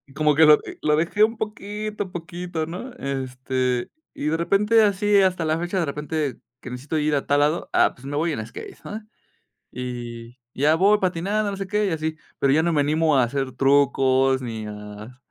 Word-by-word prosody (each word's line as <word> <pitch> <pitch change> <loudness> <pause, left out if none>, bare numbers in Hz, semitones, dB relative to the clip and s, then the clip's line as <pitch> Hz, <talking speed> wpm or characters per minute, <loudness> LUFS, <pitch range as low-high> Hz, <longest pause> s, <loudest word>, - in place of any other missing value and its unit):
Como 150 -1 +3
que 160 +2 +7
lo 150 0 +9
e - - -9
lo 150 0 +3
dejé 170 +6 +2
un 225 +1 +2
poquito, 210 -1 -5
poquito, 175 -1 -5
¿no? 180 +11 -7
Este, 130 - -2 0.2
y - - -6
de 155 +2 +1
repente 210 +6 +3
así 205 0 +3
hasta 185 -3 +1
la 155 0 +1
fecha, 175 +3 -2
de 170 - +1
repente 150 -2 -3 0.2
que 130 - -9
necesito 130 +6 -4
ir 150 0 +1
a 140 - -1
tal 145 0 +2
lado, 150 +3 +1
ah, - - +4
pues 125 - -15
me 145 +1 -3
voy 165 +1 0
en 110 -5 -4
skate, 115 - -10
¿no? 215 +2 -6 0.7
Y 120 -1 -7 0.2
ya 150 +4 +3
voy 200 +5 +4
patinando, 195 +3 0
no - - -4
sé 195 - -4
qué 210 +2 +1
y - - 0
así, 160 0 -2 0.2
pero 135 - +3
ya 155 - +4
no 170 +1 +1
me 150 - +3
animo 155 +1 +2
a 130 - +5
hacer 130 +1 -2
trucos 135 -1 +3
ni 115 -3 -5
a 105 +3 -9
155 Hz, 205 wpm, -23 LUFS, 130-180 Hz, 0.7 s, lo